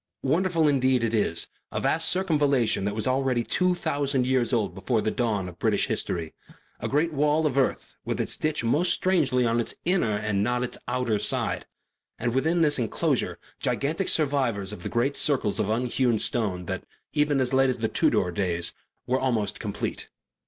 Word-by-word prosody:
Wonderful 165 +2 +2
indeed 130 -3 +2
it 115 0 0
is, 100 -6 +1 0.2
a - - -2
vast 165 +1 +1
circumvallation 145 - +2
that 100 0 -2
was 110 - -1
already 130 -2 +1
two 180 +8 +1
thousand 140 -5 -1
years 130 -1 +1
old 105 -8 0
before 110 +5 -1
the 110 - 0
dawn 110 -7 -1
of 85 -1 -11
British - - +2
history; 80 -3 -2 0.5
a - - -3
great 155 +4 +1
wall 150 +2 +2
of 145 -4 0
earth 135 -2 0
with - - -3
its - - -1
ditch 155 -4 -1
most 150 +10 +2
strangely 140 -10 +2
on 115 0 +1
its 120 - -2
inner 165 - +1
and 105 -1 0
not 120 +3 +1
on 125 - -1
its 125 - -4
outer 120 -4 0
side; - - 0 0.5
and 120 0 -1
within 160 +6 +2
this 145 -3 +2
enclosure 115 - 0 0.2
gigantic 160 +7 -1
survivors 130 -10 0
of 90 - -9
the - - -4
great 125 +4 0
circles 130 -8 +1
of 105 - 0
unhewn 120 +1 +1
stone 100 -6 -1
that, 95 +1 -4 0.3
even 150 -2 +2
as 130 0 0
late 135 0 +4
as 130 - -1 0.2
Tudor 90 - +2
days, 85 -2 -1 0.3
were 130 +1 +1
almost 115 -6 -1
complete. - - -4
125 Hz, 180 wpm, -26 LUFS, 110-145 Hz, 0.5 s, late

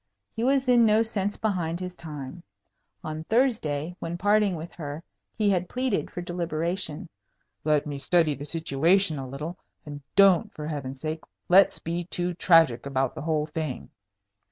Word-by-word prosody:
He 225 - -2
was 265 +1 +2
in 245 -2 +6
no 220 0 +4
sense 205 -3 -1
behind 175 -6 -1
his 180 -1 -5
time. 150 -1 -8 0.6
On 155 0 -5
Thursday, 180 - 0
when 170 +1 -4
parting 205 0 +3
with 165 +1 -7
her, 150 -1 -6 0.3
he 210 -2 +3
had 180 -2 0
pleaded 255 -4 -1
for 175 - -6
deliberation. 170 0 -2 0.6
"Let 150 -1 +2
me 145 -2 -5
study 155 +2 +2
the 140 +1 -7
situation 165 +2 +1
a 130 -1 -6
little; 150 +7 -6 0.3
and 145 -1 -8
don't, 195 +1 +5
for 150 - -6
Heaven's 135 -3 -5
sake, 155 0 -3 0.3
let's 190 +3 +6
be 170 +1 -4
too 175 0 -2
tragic 165 -8 +4
about 135 -2 0
the - - -7
whole 155 -1 0
thing." 155 -3 -5
170 Hz, 160 wpm, -26 LUFS, 150-195 Hz, 0.6 s, in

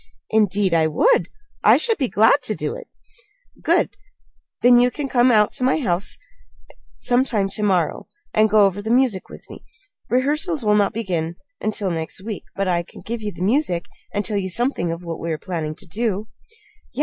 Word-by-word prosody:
"Indeed 205 -3 +2
I 160 -1 +3
would! 475 - +2 0.3
I - - +7
should 455 -5 +2
be 265 - +1
glad 225 +6 +4
to - - -1
do - - -3
it." - - -9 0.7
"Good! - - +1 0.7
Then 245 0 +7
can 295 - -6
you - - -2
come 250 0 +4
out 210 -3 +4
to 260 - -5
my 260 - +3
home 190 - 0 1.0
sometime 245 -5 +1
to 205 - -4
morrow, 185 -6 0 0.3
and 215 0 +4
go 215 0 +5
over 195 +1 -1
the 220 - -5
music 240 -5 +2
with - - -13
me? - - -12 0.5
Rehearsals 295 - 0
will 210 - +4
not 205 -1 +3
begin 175 -7 -2 0.3
until 205 -3 -1
next 160 -1 -4
week; 215 -1 -6
but 195 -1 -1
I 175 -2 +1
can 170 - -13
give 235 0 -4
you 210 -1 -3
the 180 - -6
music, 205 - +1 0.3
and 205 -1 -2
tell 210 -2 -1
you 190 -1 -2
something 235 -4 0
of 165 +1 -6
what 170 -1 -5
we 165 - -3
are - - -3
planning 155 -1 -4
to - - -10
do." 210 +2 -2 0.6
"Yes. - - -9
210 Hz, 195 wpm, -21 LUFS, 180-245 Hz, 1.0 s, I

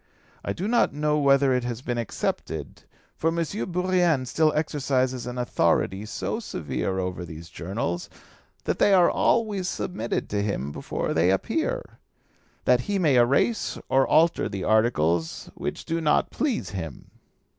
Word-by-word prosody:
I - - -2
do 180 - -3
not 235 - +2
know 150 0 +1
whether 140 -1 +4
it 125 -1 +1
has 120 0 -4
been 120 -2 -2
accepted, 80 -8 -4 0.3
for 160 - -1
M. 165 - +1 0.4
Bourrienne 175 -6 +2
still 155 +5 +2
exercises 130 -5 0
an 125 0 -5
authority 100 -3 +1
so 220 - -3
severe 75 - -3
over 90 -1 -3
these 85 0 -9
journals 85 0 -3 0.5
that - - -1
they 200 - +5
are 180 -2 +5
always 205 -5 +1
submitted 120 -9 -3
to 100 0 0
him 100 -9 -2
before - - -3
they 85 +3 +3
appear, 325 - 0 0.8
that - - +4
he 200 - +1
may 155 -8 +3
erase 135 - +2
or 135 0 +3
alter 165 +2 +3
the 95 -2 -4
articles 85 -8 +1
which - - -5
do 165 +1 -1
not 150 -2 +2
please 265 -3 -1
him." 80 -7 -7
125 Hz, 150 wpm, -25 LUFS, -, 0.8 s, they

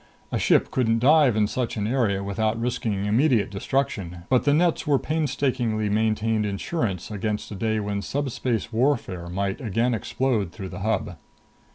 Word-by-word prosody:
A - - 0
ship - - +3
couldn't 115 -3 +2
dive 140 0 +5
in 105 -1 +3
such 120 +2 -2
an 105 - -1
area 110 -5 +1
without 110 +3 -1
risking 110 -4 -1
immediate 115 0 +2
destruction; 100 -6 -2
but 130 +1 +3
the 145 - +4
nets 170 -1 +1
were 145 -2 +4
painstakingly 130 -8 -1
maintained 110 +1 +1
insurance 100 - -2
against 105 +1 -3
a - - -5
day 110 +2 0
when 100 -1 -2
subspace 125 -4 -2
warfare 110 -8 0
might 95 +6 -2
again 115 +2 0
explode 110 -3 -1
through 95 -2 -7
the - - -7
Hub. 100 -4 -1
110 Hz, 160 wpm, -24 LUFS, 100-130 Hz, -, dive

